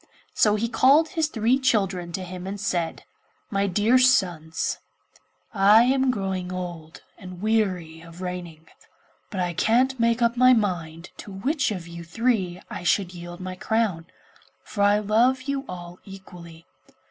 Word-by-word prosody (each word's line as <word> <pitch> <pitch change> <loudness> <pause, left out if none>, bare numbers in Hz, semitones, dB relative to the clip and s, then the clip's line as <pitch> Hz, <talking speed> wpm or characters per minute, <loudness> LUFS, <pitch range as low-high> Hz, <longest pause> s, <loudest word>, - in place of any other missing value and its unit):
So 210 -1 +3
he 220 +2 -1
called 280 +7 +4
his 320 -4 0
three 240 -1 +1
children 195 -9 0
to 190 - -3
him 180 0 -7
and 200 +1 -5
said, 175 -5 -2 0.5
'My 200 -1 +1
dear 210 +7 +3
sons, 175 -11 +1 0.7
I 210 +2 +6
am 265 +1 +2
growing 190 -5 -2
old, 175 -3 -7 0.2
and 185 0 -9
am 175 - -12
weary 185 -7 -1
of 165 +1 -13
reigning, 175 -3 -6 0.6
but 195 - -5
I 175 -1 -1
can't 250 +8 +2
make 230 +1 +2
up 235 0 +2
my 255 +1 +6
mind 175 -6 -2
to 205 - -9
which 260 +11 -1
of 180 -5 -5
you 170 0 -9
three 185 -1 -1
I - - -7
should 180 +1 +1
yield 175 0 -9
my 185 0 -5
crown, 200 -5 -1 0.6
for 205 - -5
I 205 +1 +5
love 230 +5 +2
you 280 0 -3
all 175 -1 -8
equally. 175 -4 -12
195 Hz, 160 wpm, -24 LUFS, 175-230 Hz, 0.7 s, I